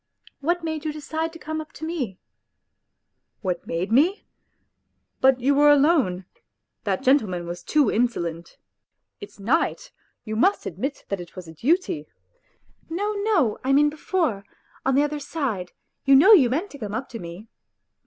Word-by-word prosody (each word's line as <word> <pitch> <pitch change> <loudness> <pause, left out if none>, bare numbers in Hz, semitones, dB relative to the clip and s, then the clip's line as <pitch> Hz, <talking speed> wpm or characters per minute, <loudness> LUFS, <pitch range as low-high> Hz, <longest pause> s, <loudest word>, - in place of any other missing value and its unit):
What 345 +4 0
made 315 -2 -3
you 310 - -2
decide 315 +2 -3
to - - -9
come 315 0 -4
up 310 +1 -12
to 315 - -7
me? 270 - -3 0.4
" - - -54
" - - -53
What 180 -3 -3
made 180 +5 -2
me?... 325 - +3 1.0
But 265 -1 +4
you 270 +3 +2
were 295 +1 +5
alone; 275 - +3 0.6
that 195 +3 -1
gentle 265 -3 +4
man 175 -1 -4
was 175 +1 -6
too 295 -7 +2
insolent; 170 -8 -2 0.6
it's 410 - -11
night. 320 - 0 0.3
You 215 -1 -5
must 380 - +2
admit 260 - -4
that 200 -2 -2
it 175 - -12
was 185 -3 -8
a 160 - -10
duty... 250 - 0 0.3
." - - -41
" - - -36
No, 405 +6 -1
no; 405 - +1
I 270 +1 +2
mean 295 +1 +4
before, 310 - -1 0.4
on 265 0 +2
the 285 - +4
other 295 0 -2
side 240 - -3 0.3
you 275 0 +6
know 380 +11 +8
you 275 - +6
meant 325 - -2
to 285 - -11
come 210 -3 -4
up 255 - -3
to 230 - -7
me." 175 +5 -9
275 Hz, 180 wpm, -24 LUFS, 200-315 Hz, 1.0 s, know